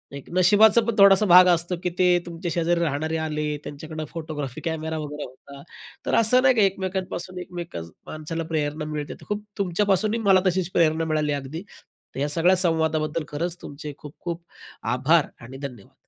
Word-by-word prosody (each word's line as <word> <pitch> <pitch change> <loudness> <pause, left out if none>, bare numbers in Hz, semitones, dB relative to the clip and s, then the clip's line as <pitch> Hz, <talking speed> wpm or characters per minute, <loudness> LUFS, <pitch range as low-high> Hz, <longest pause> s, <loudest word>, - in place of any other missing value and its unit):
एक 140 - -10
नशिबाचा 205 +5 +6
पण 230 - 0
थोडासा 200 +1 +7
भाग 180 -1 +8
असतो, 175 +2 -1
की 180 - +1
ते 180 -1 +5
तुमच्या 170 0 -5
शेजारी 170 0 +1
राहणारे 160 0 -1
आले, 155 -1 -2 0.2
त्यांच्याकडं 155 +2 -7
फोटोग्राफी 155 -5 -6
कॅमेरा 160 -1 -3
वगैरे 150 -1 -5
होता. 140 +2 -12 0.4
तर - - +1
असं 230 +3 +5
नाही, 260 -1 +4
की 220 - +3
एकमेकांपासून 190 -2 -2
एकमेक 175 -1 -8 0.3
माणसाला 155 +2 -5
प्रेरणा 150 0 -1
मिळते. 150 -1 -5
तर - - -14
खूप 210 0 -2
तुमच्यापासूनही 200 +3 +1
मला 190 -1 +7
तशीच 185 -1 0
प्रेरणा 160 -1 +2
मिळाली, 155 -2 0
अगदी. 145 +5 -5 0.5
तर - - -4
या 145 +2 0
सगळ्या 170 +5 +3
संवादाबद्दल 160 -3 +1
खरंच 170 +4 -3
तुमचे 145 +1 -8
खूप-खूप 170 +3 -7 0.5
आभार 145 +5 +3
आणि 125 +3 -10
धन्यवाद. 125 -7 -9
165 Hz, 165 wpm, -24 LUFS, 150-185 Hz, 0.5 s, भाग